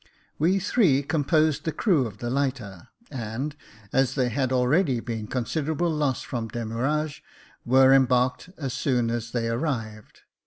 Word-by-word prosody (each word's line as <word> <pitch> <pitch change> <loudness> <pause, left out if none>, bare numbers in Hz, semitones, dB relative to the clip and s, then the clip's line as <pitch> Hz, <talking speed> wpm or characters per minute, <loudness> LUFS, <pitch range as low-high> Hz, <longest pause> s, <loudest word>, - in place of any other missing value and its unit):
We 175 +6 +3
three 180 - +2
composed 155 0 +1
the 160 - -1
crew 155 - +2
of 105 -2 -11
the 120 +2 -4
lighter 125 -10 -3 0.3
•, - - -7
and, 125 +5 -4 0.4
as 135 -1 +2
there 130 -3 +1
had 130 +2 -1
already 130 +2 +2
been 115 -2 -5
considerable 155 +7 -1
loss 145 -5 -1
from 115 -3 -4
demurrage, 130 +7 -2 0.4
were 130 +2 +6
embarked 125 +3 +2
as 135 -5 -4
soon 120 -4 0
as 120 -1 -3
they 115 -1 -2
arrived. 115 -4 -4
130 Hz, 150 wpm, -25 LUFS, 120-150 Hz, 0.4 s, were